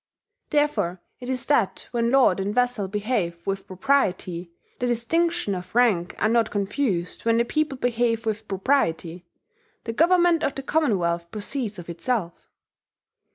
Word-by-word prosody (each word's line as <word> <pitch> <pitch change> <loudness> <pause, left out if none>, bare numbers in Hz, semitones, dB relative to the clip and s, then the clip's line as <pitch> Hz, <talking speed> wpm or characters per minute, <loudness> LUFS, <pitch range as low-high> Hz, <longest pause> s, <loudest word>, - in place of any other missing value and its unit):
Therefore 290 - +1 0.2
it 250 - -7
is 260 -1 -2
that 240 -9 +1
when 235 -1 +1
lord 255 -8 +4
and 200 +3 -2
vassal 245 -5 +1
behave 205 -4 -1
with 195 0 -3
propriety, 185 -5 0 0.3
the 245 - 0
distinctions 330 - 0
of 180 +4 -8
rank 210 -8 +3
are - - +2
not 230 0 +2
confused 200 -3 -2
when 230 0 +3
the 235 - +3
people 305 +1 -1
behave 235 -2 0
with 220 0 -3
propriety, 180 -6 0 0.6
the 230 - -4
government 345 +3 +4
of 275 - 0
the 275 - -5
Commonwealth 180 - 0
proceeds 215 +2 -4
of 175 - -9
itself." 175 +1 -3
225 Hz, 145 wpm, -24 LUFS, 185-260 Hz, 0.6 s, lord